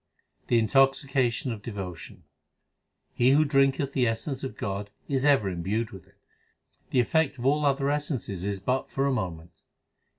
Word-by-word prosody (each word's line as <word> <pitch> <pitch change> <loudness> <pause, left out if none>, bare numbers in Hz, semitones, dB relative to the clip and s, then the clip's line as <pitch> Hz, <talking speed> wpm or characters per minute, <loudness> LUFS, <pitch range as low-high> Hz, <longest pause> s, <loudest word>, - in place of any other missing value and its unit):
The 120 - +3
intoxication 135 +1 +2
of 110 -3 -6
devotion: 95 -6 -7 0.9
He 125 +2 +4
who 155 +2 +4
drinketh 135 -1 +2
the 125 -2 +2
essence 130 +5 -3
of 135 - -5
God 100 +1 -4 0.2
is 135 -2 0
ever 140 -8 +4
imbued 100 +6 -2
with 95 -5 -12
it; - - -27 0.7
The 130 - +2
effect 140 +3 +1
of 120 - -6
all 145 +2 +3
other 140 0 +1
essences 140 - -2
is 100 0 -2
but 125 +7 -1
for 135 - -1
a 140 - +2
moment. 85 -6 -5
125 Hz, 160 wpm, -27 LUFS, 100-135 Hz, 0.9 s, He